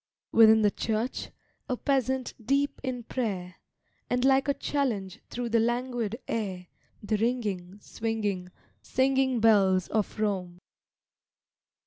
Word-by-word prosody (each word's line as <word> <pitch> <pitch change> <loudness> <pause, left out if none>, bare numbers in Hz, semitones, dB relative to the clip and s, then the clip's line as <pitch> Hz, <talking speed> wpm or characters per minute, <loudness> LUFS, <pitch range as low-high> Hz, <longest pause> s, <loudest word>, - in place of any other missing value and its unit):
Within 220 -1 +7
the 205 - +4
church, 225 +5 -2 0.4
a 250 - 0
peasant 265 -2 0
deep 280 +4 0
in 255 -2 -3
prayer; 195 -8 -3 0.5
And 250 +1 +1
like 270 +1 +4
a 280 - +2
challenge 220 -10 -2
through 240 -1 -3
the 230 0 +3
languid 240 -1 -1
air 190 -5 -3 0.4
The 215 +1 0
ringing, 205 -5 -2
swinging, 210 -5 -2 0.3
singing 260 -1 +1
bells 195 -5 +4
of 215 0 -1
Rome. 185 -5 -1
225 Hz, 115 wpm, -28 LUFS, 205-255 Hz, 0.5 s, Within